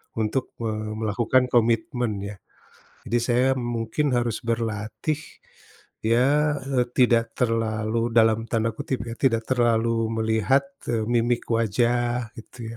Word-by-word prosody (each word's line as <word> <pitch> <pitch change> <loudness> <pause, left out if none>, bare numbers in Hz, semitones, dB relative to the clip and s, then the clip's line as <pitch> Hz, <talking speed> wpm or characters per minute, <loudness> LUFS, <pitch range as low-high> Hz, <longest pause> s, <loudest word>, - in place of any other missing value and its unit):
untuk, 115 +4 -2
eee, 110 -1 -3
melakukan 115 +4 +1
komitmen 120 0 +1
ya. 100 +1 -6 0.7
Jadi, 120 - +2
saya 120 +2 +2
mungkin 120 +4 -1
harus 120 -2 0
berlatih. 115 +5 -2 0.9
Ya, 145 +6 +3
eee, 130 -2 0
tidak 115 -2 +3
terlalu 115 -1 0
dalam 115 -1 +4
tanda 115 0 +1
kutip 120 -1 -4
ya, 115 - -5
"tidak 115 -4 +1
terlalu 115 -2 +1
melihat," 110 +5 +2 0.3
eee, 115 -2 0
"mimik 120 0 +1
wajah" 120 +1 +1
gitu 115 0 -9
115 Hz, 120 wpm, -24 LUFS, 110-120 Hz, 0.9 s, dalam